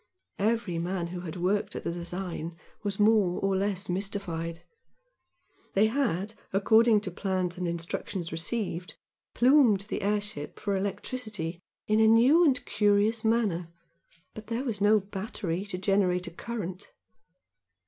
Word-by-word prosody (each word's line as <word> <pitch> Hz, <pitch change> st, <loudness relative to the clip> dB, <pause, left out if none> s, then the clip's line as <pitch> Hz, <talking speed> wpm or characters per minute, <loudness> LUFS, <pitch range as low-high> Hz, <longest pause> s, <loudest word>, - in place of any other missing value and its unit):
Every 210 Hz, -4 st, 0 dB
man 175 Hz, 0 st, -2 dB
who 180 Hz, +1 st, -5 dB
had 175 Hz, -2 st, -6 dB
worked 185 Hz, +3 st, 0 dB
at -, -, -5 dB
the -, -, -2 dB
design 170 Hz, -1 st, -4 dB, 0.2 s
was 205 Hz, -2 st, -3 dB
more 210 Hz, -4 st, +4 dB
or 195 Hz, 0 st, +1 dB
less 195 Hz, 0 st, -1 dB
mystified. 180 Hz, -3 st, -3 dB, 1.1 s
They 200 Hz, +2 st, +5 dB
had, 220 Hz, -6 st, -1 dB, 0.2 s
according 220 Hz, +2 st, +4 dB
to 185 Hz, -, -4 dB
plan 185 Hz, -1 st, -1 dB
and 180 Hz, -1 st, -3 dB
instructions 170 Hz, +1 st, -4 dB
received, 180 Hz, +1 st, -2 dB, 0.4 s
"plumed" 245 Hz, -6 st, +5 dB
the -, -, -2 dB
airship 205 Hz, -7 st, -2 dB
for 200 Hz, -1 st, -1 dB
electricity 200 Hz, -3 st, -3 dB, 0.3 s
in 215 Hz, +1 st, +2 dB
a 220 Hz, -, +6 dB
new 250 Hz, +10 st, +6 dB
and 270 Hz, -6 st, +2 dB
curious 210 Hz, +2 st, +2 dB
manner, 210 Hz, -7 st, +1 dB, 0.6 s
but 215 Hz, -1 st, -10 dB
there 230 Hz, +3 st, -2 dB
was 225 Hz, -7 st, -3 dB
no 210 Hz, +1 st, +5 dB
battery 195 Hz, -2 st, -4 dB
to 185 Hz, -, -4 dB
generate 185 Hz, -2 st, +1 dB
a 175 Hz, -, -7 dB
current. 195 Hz, -1 st, -6 dB
195 Hz, 140 wpm, -28 LUFS, 180-220 Hz, 1.1 s, a